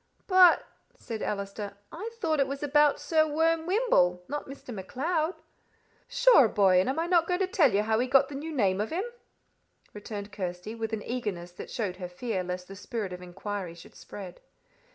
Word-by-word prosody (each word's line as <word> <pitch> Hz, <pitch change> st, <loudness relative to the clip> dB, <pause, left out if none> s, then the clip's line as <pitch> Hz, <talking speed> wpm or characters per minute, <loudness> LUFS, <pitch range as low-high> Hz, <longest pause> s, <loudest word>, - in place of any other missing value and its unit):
"But," 370 Hz, -2 st, +6 dB, 0.3 s
said 225 Hz, -3 st, -7 dB
Allister, 200 Hz, 0 st, -4 dB
"I 420 Hz, +7 st, -5 dB
thought 315 Hz, -8 st, 0 dB
it 275 Hz, -, +3 dB
was 275 Hz, +1 st, -5 dB
about 295 Hz, 0 st, +4 dB
Sir 315 Hz, -1 st, +2 dB
Worm 325 Hz, +1 st, +1 dB
Wymble 265 Hz, -, +2 dB
not 295 Hz, +1 st, -4 dB
Mr. 270 Hz, -2 st, -9 dB
MacLeod." 310 Hz, -, -2 dB, 0.7 s
"Sure, -, -, +6 dB
boy, 195 Hz, -3 st, +4 dB
and 185 Hz, -, +1 dB
am 265 Hz, -, -1 dB
I 330 Hz, -, +1 dB
not 340 Hz, -1 st, +3 dB
going 360 Hz, +1 st, 0 dB
to -, -, +4 dB
tell 330 Hz, -8 st, +3 dB
you 200 Hz, +1 st, +2 dB
how 220 Hz, 0 st, +1 dB
he 250 Hz, -, +1 dB
got 270 Hz, +1 st, +5 dB
the 290 Hz, -, -9 dB
new 300 Hz, +4 st, -5 dB
name 200 Hz, -9 st, +1 dB
of 215 Hz, -, -2 dB
him?" 355 Hz, +5 st, -1 dB, 0.9 s
returned 205 Hz, 0 st, -7 dB
Kirsty, 185 Hz, +2 st, -5 dB
with 225 Hz, -1 st, -4 dB
an 220 Hz, -2 st, -3 dB
eagerness 205 Hz, -8 st, -4 dB
that 175 Hz, -, -9 dB
showed 205 Hz, -7 st, -3 dB
her 180 Hz, -2 st, -6 dB
fear 190 Hz, +1 st, -3 dB
lest 180 Hz, 0 st, -5 dB
the 195 Hz, -, -9 dB
spirit 205 Hz, -2 st, -4 dB
of 180 Hz, -, -8 dB
inquiry 185 Hz, 0 st, -5 dB
should 170 Hz, -, -14 dB
spread. 185 Hz, -3 st, -10 dB
225 Hz, 195 wpm, -28 LUFS, 195-310 Hz, 0.9 s, But